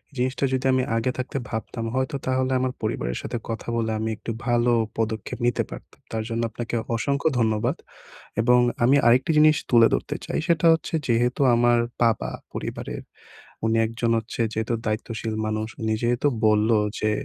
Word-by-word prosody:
জিনিসটা 130 +2 0
যদি 130 0 -1
আমি 130 0 +2
আগে 115 +3 0
থাকতে 130 +2 -3
ভাবতাম 115 +1 -4
হয়তো 130 +1 -1
তাহলে 130 0 0
আমার 130 0 0
পরিবারের - - -2
সাথে 120 - -4
কথা 115 -1 -5
বলে 110 -1 0
আমি 110 +1 -1
একটু 115 - -5 0.2
ভালো 120 0 +3 0.3
পদক্ষেপ 110 -2 -2
নিতে 120 - +1
পারতাম। - - -11
তার 110 -1 -2
জন্য 115 0 -1
আপনাকে 115 +2 -5 0.2
অসংখ্য 140 +5 0
ধন্যবাদ। 110 -2 +1 0.6
এবং 125 +2 +5 0.3
আমি 130 +4 +5
আরেকটি 125 +7 +4
জিনিস 155 0 +6
তুলে 115 -2 +7
ধরতে - - -2
চাই, - - -2
সেটা 170 -2 +2
হচ্ছে 160 0 -1
যেহেতু 120 +2 +1
আমার 120 0 +4 0.2
বাবা 115 -2 +2 0.2
পরিবারের, - - -5 0.6
উনি 110 0 +2
একজন 115 +1 -2
হচ্ছে 115 +1 -6
যেহেতু 110 +2 -1
দায়িত্বশীল 110 +1 -3
মানুষ। 110 0 -2
উনি 110 -1 0
যেহেতু 120 +3 +1 0.2
বললো 110 +1 +4 0.2
যে 110 - +1
115 Hz, 165 wpm, -24 LUFS, 110-130 Hz, 0.6 s, তুলে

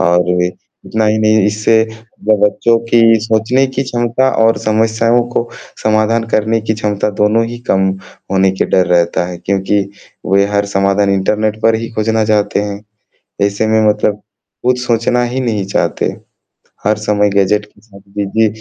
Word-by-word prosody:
औरभी। 90 0 +2 0.4
इतना 110 0 -1
ही 105 +1 +1
नहीं 110 -1 +3
इससे 105 +2 +1 0.5
ब 110 +1 +4
बच्चों 115 +3 +2
की 120 - +4 0.2
सोचने 115 +4 +1
की 135 - 0
क्षमता 120 0 0 0.2
और 115 0 +3
समस्याओं 115 +2 +1
को 120 0 -2 0.3
समाधान 110 +1 +1
करने 110 0 +1
की 110 0 -2
क्षमता 105 -1 -1
दोनों 110 +2 +3
ही 120 +1 -7
कम 95 0 +2 0.4
होने 95 0 +3
के 95 - -1
डर 90 -2 +2
रहता 85 0 +1
है, 90 - -6
क्योंकि 100 +2 0 0.5
वे 100 0 +4
हर 100 0 +2
समाधान 100 0 +1
इंटरनेट 105 +2 0
पर 115 0 +4
ही 115 - -4
खोजना 110 0 0
चाहते 105 -2 +1
हैं। 100 0 -5 0.6
ऐसे 100 +2 -1
में 110 0 +2
मतलब 105 0 0 0.4
कुछ 125 0 +1
सोचना 120 +1 +1
ही 120 +2 -2
नहीं 110 -6 -2
चाहते, 100 - -1 0.8
हर 105 +1 +2
समय 105 -1 +1
गैजेट 100 +1 +1
के 105 -1 -26
साथ 100 -3 -17 0.2
बिज़ी 105 +2 +1
110 Hz, 160 wpm, -14 LUFS, 100-115 Hz, 0.8 s, ब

